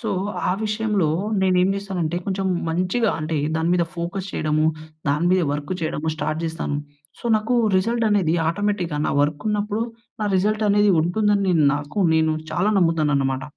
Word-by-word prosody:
So, 225 Hz, -, -4 dB, 0.4 s
ఆ -, -, +3 dB
విషయంలో 210 Hz, -5 st, 0 dB, 0.3 s
నేనేం 185 Hz, 0 st, +3 dB
జేస్తానంటే 185 Hz, -5 st, -3 dB
కొంచెం 195 Hz, -1 st, -1 dB, 0.2 s
మంచిగా 185 Hz, +7 st, +1 dB
అంటే 155 Hz, +1 st, -2 dB, 0.2 s
దాని 160 Hz, +1 st, 0 dB
మీద 175 Hz, -1 st, +2 dB
ఫోకస్ 180 Hz, +3 st, -4 dB
చేయడము, 155 Hz, 0 st, +1 dB, 0.4 s
దాని 150 Hz, +4 st, +1 dB
మీద 185 Hz, 0 st, +4 dB
వర్క్ 145 Hz, +4 st, -3 dB
చేయడము 160 Hz, 0 st, -2 dB
స్టార్ట్ 155 Hz, +1 st, -2 dB
జేస్తాను. 160 Hz, -3 st, -2 dB, 0.4 s
సో, -, -, -19 dB
నాకు 220 Hz, +3 st, -1 dB, 0.2 s
రిజల్ట్ 230 Hz, +4 st, +1 dB
అనేది 185 Hz, -6 st, +2 dB
ఆటోమేటిక్‌గా 185 Hz, -4 st, -1 dB
నా -, -, 0 dB
వర్క్ 145 Hz, +5 st, -2 dB
ఉన్నప్పుడు 210 Hz, +1 st, -1 dB, 0.4 s
నా -, -, +1 dB
రిజల్ట్ 215 Hz, +3 st, +1 dB
అనేది 205 Hz, 0 st, +4 dB
ఉంటుందని 200 Hz, +2 st, +1 dB, 0.2 s
నాకు 145 Hz, +6 st, -5 dB, 0.2 s
నేను 160 Hz, -1 st, +2 dB, 0.2 s
చాలా 185 Hz, +6 st, +1 dB
నమ్ముతాననమాట. 145 Hz, -6 st, +1 dB
180 Hz, 150 wpm, -22 LUFS, 160-205 Hz, 0.4 s, మీద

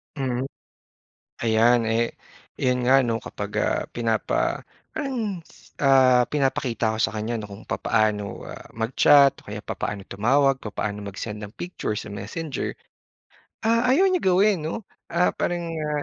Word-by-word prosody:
Mm. 130 Hz, -2 st, -2 dB, 1.0 s
Ayan 115 Hz, +1 st, +4 dB
eh, 115 Hz, +1 st, +1 dB, 0.4 s
yun 125 Hz, -1 st, 0 dB
nga 135 Hz, +1 st, +6 dB
'no 115 Hz, -2 st, 0 dB
kapag -, -, -6 dB
ah, -, -, +1 dB
pinapa 115 Hz, -2 st, 0 dB, 0.3 s
parang 250 Hz, -, -3 dB
s -, -, -21 dB
ah, 130 Hz, -3 st, +6 dB
pinapakita 125 Hz, -6 st, 0 dB
ko -, -, -5 dB
sa -, -, +2 dB
kanya 110 Hz, +2 st, -2 dB
'no 105 Hz, -, -7 dB
kung 100 Hz, +2 st, -10 dB
papaano, 105 Hz, -3 st, 0 dB
ah, -, -, -10 dB
mag-chat, 135 Hz, +5 st, +5 dB
o -, -, -24 dB
kaya 105 Hz, -, -4 dB
papaano 100 Hz, -2 st, -4 dB
tumawag, 135 Hz, +6 st, +2 dB
papaano 105 Hz, -1 st, -4 dB
mag-send 105 Hz, +2 st, -6 dB
ng 105 Hz, +1 st, -9 dB
picture 175 Hz, -11 st, -3 dB
sa 105 Hz, -, -7 dB
Messenger, 125 Hz, +9 st, -4 dB, 0.9 s
ah, 230 Hz, +1 st, +3 dB
ayaw 360 Hz, +9 st, +5 dB
niya 370 Hz, -1 st, +1 dB
gawin 190 Hz, -2 st, +3 dB
'no. 175 Hz, +7 st, -4 dB, 0.3 s
Ah, 175 Hz, +2 st, +2 dB
parang, 175 Hz, -1 st, -1 dB
ah, 150 Hz, -2 st, -2 dB
125 Hz, 145 wpm, -24 LUFS, 110-160 Hz, 1.0 s, nga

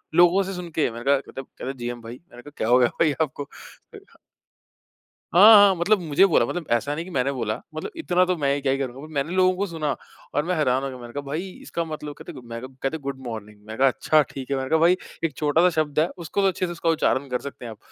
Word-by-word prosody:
लोगों 175 Hz, +3 st, +5 dB
से 195 Hz, +1 st, -5 dB
सुन 180 Hz, -1 st, -6 dB
के। 155 Hz, -, +2 dB
मैंने 120 Hz, +1 st, -8 dB
कहा 135 Hz, -1 st, -1 dB, 0.2 s
मत 135 Hz, -, -4 dB
जीएम 120 Hz, 0 st, -5 dB
भाई। 115 Hz, +1 st, -8 dB, 0.2 s
मैंने 120 Hz, -, -12 dB
कहा 145 Hz, -, -13 dB
क्या 110 Hz, -, -1 dB
हो 125 Hz, +1 st, +6 dB
गया 125 Hz, -, +5 dB
भाई 160 Hz, -2 st, +4 dB
आपको? 145 Hz, -1 st, -2 dB, 1.9 s
हाँ, 210 Hz, +6 st, +9 dB
हाँ 200 Hz, -2 st, +7 dB
मतलब 195 Hz, +4 st, +2 dB
मुझे 160 Hz, +2 st, +4 dB
बोला 185 Hz, -, +3 dB
मतलब 175 Hz, -2 st, -4 dB
ऐसा 120 Hz, +5 st, +1 dB
नहीं 165 Hz, -, -4 dB
कि 185 Hz, -, -10 dB
मैंने 135 Hz, -2 st, 0 dB
बोला। 115 Hz, -5 st, -2 dB, 0.2 s
मतलब 155 Hz, -, -5 dB
इतना 180 Hz, -, +2 dB
तो 185 Hz, 0 st, 0 dB
मैं 140 Hz, -1 st, 0 dB
क्या 135 Hz, -1 st, +1 dB
ही 135 Hz, -, +1 dB
करूँगा। 135 Hz, +2 st, -5 dB
मैंने 145 Hz, +4 st, -1 dB
लोगों 185 Hz, 0 st, +4 dB
को 200 Hz, -, 0 dB
सुना 155 Hz, -4 st, -2 dB, 0.4 s
और 145 Hz, -, +2 dB
मैं 180 Hz, -, 0 dB
हैरान 135 Hz, -4 st, +1 dB
हो 135 Hz, -, -2 dB
गया। 130 Hz, -, -8 dB
मैंने 120 Hz, -1 st, -11 dB
कहा 145 Hz, -, -3 dB
भाई 155 Hz, +7 st, -4 dB
इसका 170 Hz, -, -3 dB
मतलब 150 Hz, -2 st, -6 dB
कहते -, -, -10 dB
मैं 115 Hz, 0 st, -6 dB, 0.2 s
क्या 135 Hz, +4 st, -1 dB
गुड 140 Hz, -1 st, -4 dB
मॉर्निंग। 105 Hz, -2 st, -7 dB
मैं 110 Hz, -, -7 dB
कहा 135 Hz, -, +5 dB
अच्छा 155 Hz, +4 st, +3 dB
ठीक 135 Hz, 0 st, -8 dB
है। 135 Hz, -, +1 dB
मैंने 130 Hz, 0 st, -3 dB
कहा 160 Hz, -, +3 dB
भाई 175 Hz, +3 st, +4 dB, 0.3 s
एक 155 Hz, -5 st, -1 dB
छोटा-सा 160 Hz, +4 st, +3 dB
शब्द 150 Hz, -1 st, -2 dB
है 160 Hz, -, +3 dB
उसको 175 Hz, +3 st, -2 dB
तो 195 Hz, -, +4 dB
अच्छे 185 Hz, -1 st, 0 dB
से 175 Hz, -, -5 dB
उसका 170 Hz, -1 st, -2 dB
उच्चारण 140 Hz, -4 st, +1 dB
कर 125 Hz, 0 st, -1 dB
सकते 140 Hz, -3 st, -8 dB
हैं 115 Hz, -, -6 dB
आप। 110 Hz, -, -11 dB
145 Hz, 250 wpm, -24 LUFS, 130-175 Hz, 1.9 s, हाँ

